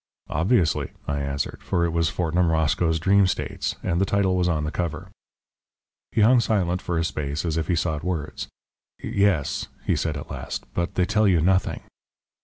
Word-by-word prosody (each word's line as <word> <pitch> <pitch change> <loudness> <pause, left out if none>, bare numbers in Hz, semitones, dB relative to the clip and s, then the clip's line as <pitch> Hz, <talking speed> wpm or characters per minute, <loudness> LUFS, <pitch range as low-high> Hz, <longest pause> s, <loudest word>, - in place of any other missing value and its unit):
"Obviously," 85 +2 +1
I 70 0 -1
answered, 70 0 -3
for 85 -1 0
it 85 - -1
was 85 -1 +2
Fortnum 85 0 +1
Roscoe's 80 +1 +2
Dream 95 +3 +4
States, - - -2
and 90 0 0
the - - +4
title 95 -1 +1
was 90 -1 +2
on 75 -3 0
the 75 - -2
cover. 85 -3 -4 1.0
He 110 - +1
hung 120 +4 +6
silent 95 -6 +1
for 85 - -2
a 80 - +1
space 75 -2 -3
as 80 -2 -1
if 80 -2 -1
he 90 - +2
sought 80 -2 -1
words. 85 -4 -3 0.5
"Yes," 100 -8 0 0.2
he - - +2
said 80 -2 -1
at 70 - -8
last, - - -5
"but 85 0 -2
they 90 - +3
tell 105 +2 +2
you 90 -4 +4
nothing." 95 +3 +1
85 Hz, 185 wpm, -24 LUFS, 80-95 Hz, 1.0 s, hung